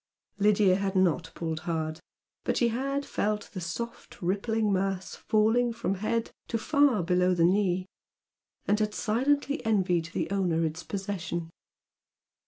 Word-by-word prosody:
Lydia 205 -2 +4
had 195 0 -2
not 175 -3 +2
pulled 160 -1 -3
hard, 160 -1 -3 0.4
but - - 0
she 240 - +3
had 275 +4 -1
felt 210 0 -2
the 185 - -5
soft 205 +8 -6
rippling 205 +3 0
mass 190 0 -1
falling 225 +3 +2
from 230 -4 -2
head 215 +4 -1 0.2
to 230 - -1
far 280 - +3
below 180 +1 +2
the 170 -1 +4
knee, 185 -1 +2 0.8
and 210 +1 +2
had 210 -1 0
silently 285 +6 +1
envied 185 -6 +2
the 170 - -3
owner 175 -4 +1
its 160 +2 -3
possession. 180 -4 -4
195 Hz, 140 wpm, -28 LUFS, 175-225 Hz, 0.8 s, Lydia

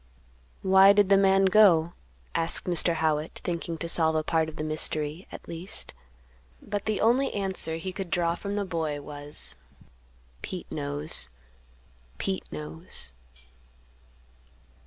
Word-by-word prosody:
"Why 190 +1 +7
did 205 -1 +3
the 200 - +7
man 195 0 +4
go?" 180 -5 +5 0.4
asked 165 0 +1
Mr. 175 -1 +2
Howitt, 155 -1 -1
thinking 170 -1 -3
to 170 - -4
solve 160 -1 +3
a 155 - +1
part 160 0 +1
of 155 - -11
the - - -4
mystery, 155 +2 -1
at - - -10
least. 170 +3 -7 0.7
But 205 -1 -4
the 215 -2 0
only 245 +5 +3
answer 190 -5 0
he 185 +3 -5
could 190 -1 -6
draw 170 -1 +1
from 200 +3 -5
the 205 -1 -1
boy 160 -5 -2
was, 145 - -4 0.8
"Pete - - -6
knows; 70 -2 -2 0.9
Pete 190 -1 -3
knows." 75 -4 -5
170 Hz, 135 wpm, -27 LUFS, 155-195 Hz, 0.9 s, Why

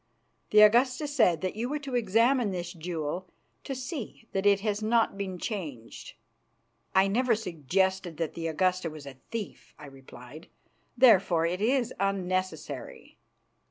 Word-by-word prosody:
"The 210 - +6
Augusta 250 +7 +4
said 220 - +2
that 185 +1 -3
you 235 +3 -3
were 300 - -1
to 275 -3 -7
examine 235 +1 +2
this 175 -2 -4
jewel 170 +1 -4 0.4
to 270 - -5
see 255 - -7
that 195 +1 0
it 200 -1 +4
has 210 0 -1
not 225 0 +2
been 195 -2 -4
changed." 155 - -6 0.8
"I 190 +1 +5
never 235 +3 +2
suggested 190 - -1
that 165 -2 -3
the 165 -1 -4
Augusta 180 +2 0
was 155 -2 -10
a 135 -2 -10
thief," 225 -4 -7
I 150 - -11
replied, 135 +2 -13 0.5
"therefore 195 -9 +5
it 180 +3 -2
is 245 +2 +1
unnecessary." 185 -1 -3
195 Hz, 145 wpm, -28 LUFS, 170-230 Hz, 0.8 s, The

